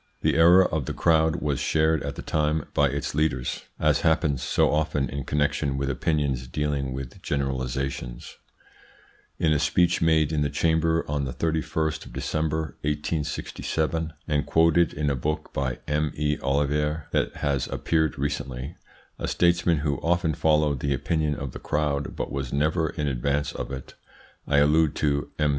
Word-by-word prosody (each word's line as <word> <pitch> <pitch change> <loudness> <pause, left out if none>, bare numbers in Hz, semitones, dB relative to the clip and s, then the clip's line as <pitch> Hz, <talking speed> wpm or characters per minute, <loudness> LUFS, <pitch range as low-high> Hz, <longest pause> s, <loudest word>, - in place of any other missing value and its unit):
The 80 - +2
error 85 +3 +7
of 75 -4 -1
the - - -3
crowd 80 0 +2
was 70 -2 0
shared 80 +1 +2
at 70 0 -4
the - - -7
time 75 0 0
by 70 - +4
its 70 +2 -3
leaders, 70 -4 -1
as - - +2
happens 80 -5 +2
so 70 - +2
often 75 -2 0
in 70 -1 -5
connection 75 -1 0
with 70 0 -1
opinions 70 -3 -1
dealing 70 0 -2
with 65 -1 -7
generalisations. 65 -2 -3 1.0
In 80 -2 +2
a 75 - +2
speech 90 +3 +2
made 80 -2 +3
in 75 - +1
the 70 - +1
Chamber 80 +2 +1
on 70 -1 -1
the 65 - -4
31st 80 0 -1
of - - -13
December, 80 -2 -2
1867, 80 +1 -2
and 75 -2 +1
quoted 85 0 +4
in 75 -2 -1
a - - 0
book 75 +4 -3
by 65 -2 -1
M. 75 0 0
E. 75 0 0
Ollivier 75 +2 0
that - - 0
has 70 -3 -1
appeared 80 -2 0
recently, 70 +2 -4 0.4
a - - -2
statesman 85 -1 +2
who 70 -2 +1
often 85 0 +1
followed 75 -2 +2
the 70 +1 0
opinion 75 +2 0
of 70 -2 -5
the - - -8
crowd 75 -2 -1
but - - -4
was 70 -2 -3
never 75 +3 +1
in 75 -3 -3
advance 70 +2 0
of - - -6
it 65 -1 -7 0.5
I 70 - +2
allude 75 +1 +4
to 70 -1 0
M. 75 -1 +2
75 Hz, 165 wpm, -25 LUFS, 70-80 Hz, 1.0 s, error